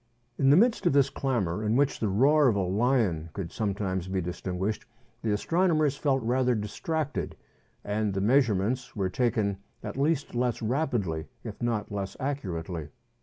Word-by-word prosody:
In 135 - +4
the 145 - +7
midst 225 -2 +3
of 170 - +3
this 140 -1 +4
clamour, 110 - -1
in 110 +1 +1
which 140 +1 +2
the 110 - 0
roar 140 +9 +4
of 115 - +3
a - - +1
lion 95 -4 +1
could 90 -4 -5
sometimes 95 -3 -2
be 95 0 -1
distinguished, 90 +3 -3 0.4
the 115 - -2
astronomers 155 - +2
felt 135 -3 0
rather 125 +1 +2
distracted, 145 +8 -3 0.5
and 105 0 -1
the - - 0
measurements 120 +1 +1
were 95 -3 0
taken 105 -2 0 0.3
at - - -5
least 145 +1 0
less 120 -1 0
rapidly, 110 - -1 0.2
if 110 -1 -8
not 115 -4 -1
less 100 -1 -4
accurately. 90 - -4
115 Hz, 160 wpm, -28 LUFS, 95-135 Hz, 0.5 s, the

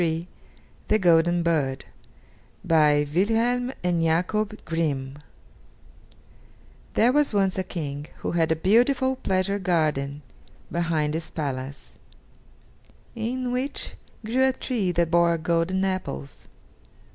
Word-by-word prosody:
THE 215 - +3
GOLDEN 175 -2 +3
BIRD 145 -6 0 0.8
BY 150 -2 +4
WILHELM 230 +7 +1
AND 175 -2 +1
JAKOB 190 +7 0
GRIMM 145 -4 -2 1.8
There 235 +3 +4
was 290 -5 +2
once 195 -1 +2
a - - 0
King 145 -5 -5
who - - -2
had 165 -2 +1
a - - +3
beautiful 250 - +2
pleasure 195 -2 0
garden 150 -6 0 0.5
behind 160 -3 0
his 160 0 -3
palace, 140 -2 -5 1.1
in 245 +2 -3
which 260 +3 -1 0.3
grew 250 +4 +1
a 265 - +1
tree 225 -9 -1
that 170 -1 0
bore 170 -1 +4
golden 170 +4 0
apples. 130 - -4
175 Hz, 110 wpm, -25 LUFS, 155-215 Hz, 1.8 s, BY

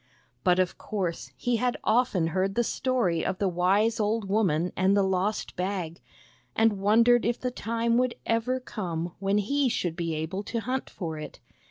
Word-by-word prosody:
But 180 0 +4
of 185 -1 0
course 190 -5 -3
he 245 -1 0
had 245 +2 0
often 215 -8 +2
heard 190 +3 0
the 240 - +2
story 235 -10 0
of 185 - -1
the 200 - +1
wise 195 +6 +2
old 215 0 0
woman 180 -5 +1
and 190 +2 +3
the 200 - +4
lost 190 +2 -1
Bag, 180 -4 -3 0.5
and 225 -3 +3
wondered 230 +4 +4
if 235 +1 0
the 250 - -2
time 230 0 0
would 255 -1 0
ever 230 +3 0
come 175 -8 -4
when 195 +1 +1
he 270 +6 +1
should 175 -7 -1
be 165 -2 -2
able 160 +5 -3
to 230 -1 -2
hunt 255 +4 -3
for 160 -4 -5
it. 155 - -8
200 Hz, 180 wpm, -27 LUFS, 180-230 Hz, 0.5 s, But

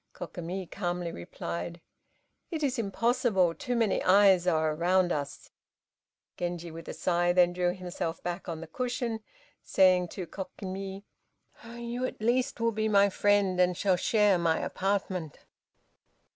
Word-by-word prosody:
Kokimi 180 +2 -5
calmly 175 -2 -3
replied, 85 - -6 0.7
"It 320 -4 -3
is 265 -3 0
impossible, 225 -4 +1
too 250 +4 -3
many 225 -4 +1
eyes 190 -2 +5
are 160 -2 +2
around 175 +3 +2
us!" 145 -3 -4 0.9
Genji 175 -1 -4
with 165 +1 -10
a - - -5
sigh 175 -1 +1
then 175 -1 +4
threw 180 0 +1
himself 175 -3 -5
back 175 +1 -4
on 165 -1 -4
the - - -6
cushion, 240 +5 -3 0.4
saying 185 -2 +4
to 180 +1 -6
Kokimi, 195 +1 -6 0.7
"You, 240 +1 -4
at - - -9
least, 245 +4 +1
will 230 0 +2
be 220 0 -1
my 200 -1 +5
friend, 200 -2 +2
and 180 -1 +2
shall 190 -2 +2
share 205 0 +3
my 165 -1 +2
apartment!" 185 -5 -2
185 Hz, 140 wpm, -29 LUFS, 175-210 Hz, 0.9 s, eyes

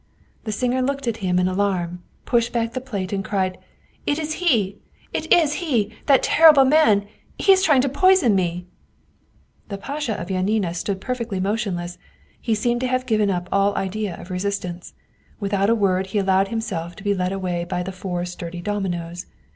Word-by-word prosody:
" - - -37
The 215 - -2
singer 250 +4 0
looked 275 0 -2
at 230 -1 -1
him 185 -4 0
in 180 0 +2
alarm, 185 -2 -1 0.2
pushed 235 -1 +1
back 230 -1 -1
the 255 - -3
plate, 200 -7 -4
and 195 -1 -1
cried: 190 -2 -1 0.5
"It 290 - +1
is 310 -1 -2
he, 215 - +1 0.3
it - - -3
is 315 -4 +5
he! 230 - 0
That 275 -3 +5
terrible 305 -4 +7
man! 260 -8 +4 0.3
He 390 - +4
is 380 -1 +5
trying 295 -8 +4
to 275 - 0
poison 330 - +4
me! 180 -2 -1 0.5
" - - -37
The 200 - -4
Pasha 275 +1 -3
of 170 - -6
Janina 190 -1 0
stood 190 +2 -3
perfectly 235 -5 -3
motionless 190 -4 -2 0.4
he 225 -2 0
seemed 240 +3 0
to 255 - 0
have 255 0 0
given 215 -3 +2
up 180 -2 -2
all 200 0 +2
idea 195 0 -3
of 180 - -10
resistance. 180 -2 -4 0.4
Without 200 -1 0
a 230 - +4
word 190 -3 +1
he 190 - -3
allowed 195 -1 +2
himself 195 -7 -4
to - - -12
be 205 -1 +2
led 185 -1 -1
away 180 -3 -2
by 180 0 -3
the 190 - -5
four 180 -1 -4
sturdy 175 -1 -7
dominos. 175 -3 -3
200 Hz, 190 wpm, -22 LUFS, 185-240 Hz, 0.5 s, terrible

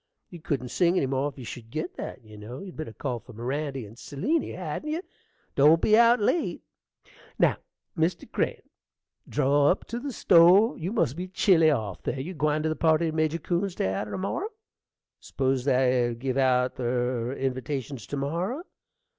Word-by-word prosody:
You 175 -3 -10
couldn't 130 -5 -2
sing 175 +6 +2
any 140 - +2
more 135 +2 0
if 145 - -16
you 130 - -8
should 115 -1 -8
git 155 +7 -4
that, 130 - -7
you 110 -1 -14
know. 105 +4 -8
You'd 190 -3 -9
better 155 -7 -6
call 125 +1 -4
for 125 - -14
Mirandy 135 +2 -3
and 105 +2 -13
Seliny, 290 - -1
hadn't 180 - -4
you? 325 +4 -2 0.5
Don't 150 +4 +6
be 215 - +4
out 235 +2 +6
late. 265 +11 0 0.7
Now, - - +3 0.4
Mr. 170 +1 0
Crane, - - -1 0.7
draw 140 +1 +3
up 185 - 0
to 235 - -3
the 280 +2 -5
stove: 185 +3 +5
you 170 +4 -3
must 180 - +1
be 180 +2 -5
chilly 180 -3 +4
off 110 -10 -2
there. 135 - -3
You 165 +8 -5
gwine 150 -1 0
to 160 - +1
the 155 - -1
party 160 0 +2
to - - -7
Major 155 0 +1
Coon's 175 +2 -2
day 95 - 0
arter 105 +2 -3
to - - -4
morrow? 270 - -2 0.7
S'pose 130 -1 -1
they'll 125 -3 +2
give 130 +2 -3
out 130 -1 +2
ther 125 -1 -1
invatations 135 0 -4
to 145 - -4
morrow. 175 - -2
145 Hz, 185 wpm, -27 LUFS, 125-175 Hz, 0.7 s, Don't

